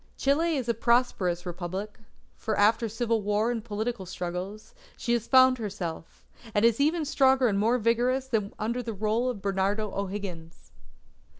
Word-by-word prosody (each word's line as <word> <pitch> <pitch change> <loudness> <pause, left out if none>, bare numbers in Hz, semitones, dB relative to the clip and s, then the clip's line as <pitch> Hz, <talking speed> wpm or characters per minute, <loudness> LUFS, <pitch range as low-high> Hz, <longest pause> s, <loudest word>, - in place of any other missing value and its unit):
Chile 315 +4 +2
is 255 -3 -3
a 235 - +2
prosperous 220 -7 +1
Republic; 185 +4 -5 0.4
for 220 -1 -3
after 220 +2 +3
civil 225 0 0
war 210 +3 +1
and 230 -3 -3
political 220 -2 -4
struggles, 185 +4 -6 0.2
she 235 - -1
has 235 -1 -1
found 260 -1 +6
herself, 190 -7 -6 0.3
and 205 +2 +4
is 230 +1 +3
even 310 +2 +2
stronger 265 -3 +3
and 200 -3 +1
more 230 +4 +3
vigorous 245 +3 +1
than 225 -5 0
when 200 - -12
under 235 +3 -2
the 230 -2 -5
rule 215 +5 0
of 215 -6 -5
Bernardo 200 +2 0
O'Higgins. 190 -4 -6
220 Hz, 165 wpm, -27 LUFS, 200-245 Hz, 0.4 s, found